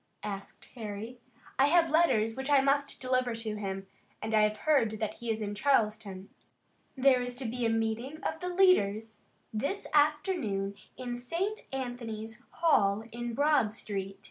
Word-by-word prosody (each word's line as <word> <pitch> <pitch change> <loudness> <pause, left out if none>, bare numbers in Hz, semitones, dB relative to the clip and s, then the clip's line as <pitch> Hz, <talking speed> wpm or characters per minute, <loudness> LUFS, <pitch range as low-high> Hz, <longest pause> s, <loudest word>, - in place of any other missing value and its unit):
asked 200 -1 -7
Harry. 225 +1 -6 0.4
"I 275 - +6
have 330 0 +4
letters 225 -9 +3
which 265 +2 -4
I 285 -1 +6
must 280 +1 +1
deliver 255 -2 0
to 225 -2 -3
him, 195 -1 -4 0.3
and 220 0 -4
I 215 - +5
have 210 0 +2
heard 235 -9 +3
that 215 - -2
he 235 - -5
is 220 0 -1
in 205 -1 -3
Charleston." 210 -5 0 0.7
"There 260 -1 +5
is 245 0 -3
to 255 +1 -3
be 240 +1 -1
a - - +1
meeting 225 +5 -1
of - - -2
the 360 - -3
leaders 225 - +3 0.3
this 285 - -2
afternoon 295 - +1 0.2
in 245 -1 -4
St. 365 - -3
Anthony's 235 -4 -5
Hall 215 -11 +2
in 240 0 -4
Broad 290 -6 +3
street. 195 -3 -5
235 Hz, 160 wpm, -30 LUFS, 215-280 Hz, 0.7 s, I